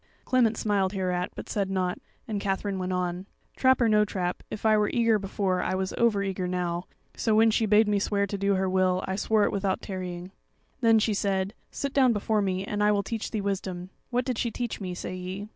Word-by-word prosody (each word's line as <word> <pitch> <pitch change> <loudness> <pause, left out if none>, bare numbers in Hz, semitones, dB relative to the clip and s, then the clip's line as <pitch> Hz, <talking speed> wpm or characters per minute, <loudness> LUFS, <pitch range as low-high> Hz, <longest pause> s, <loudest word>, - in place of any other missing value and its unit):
Clement 235 -4 +3
smiled 200 -2 +1
hereat, 180 -2 -1
but - - -7
said 200 -2 -1
nought, 185 -2 -1 0.3
and 210 -3 -2
Katherine 195 0 -1
went 185 0 -2
on: 180 +1 -2 0.3
"Trap 260 -1 +3
or 235 - +4
no 210 -1 +4
trap, 180 -3 -2
if 215 - -6
I 215 0 +5
were 210 -1 +2
eager 230 -2 +3
before, 195 -1 -1
I 185 - -1
was 190 0 -2
over 220 -4 +2
eager 190 -2 -2
now; 180 -1 -2 0.3
so 220 -2 +1
when 225 +1 +5
she 220 0 +1
bade 210 +1 +5
me 205 -1 +2
swear 200 0 +1
to 200 - -4
do 200 0 +2
her 190 0 0
will, 185 0 +2
I 190 - -1
swore 215 +1 +2
it - - +2
without 195 -1 -1
tarrying. 180 -1 -5 0.5
"Then 225 -3 +5
she 215 0 +2
said: 195 0 0 0.2
'Sit 280 -1 -4
down 260 -4 +4
before 210 0 0
me, 190 -1 -1
and 205 +1 -2
I 210 - +4
will 200 -1 +1
teach 225 0 -4
thee 215 - -2
wisdom.' 190 -2 -3 0.2
What 250 0 0
did 255 -4 -2
she 235 - 0
teach 235 -1 -4
me? 180 -2 -4
say 185 - -5
ye. 185 +3 -6
200 Hz, 230 wpm, -27 LUFS, 185-215 Hz, 0.5 s, I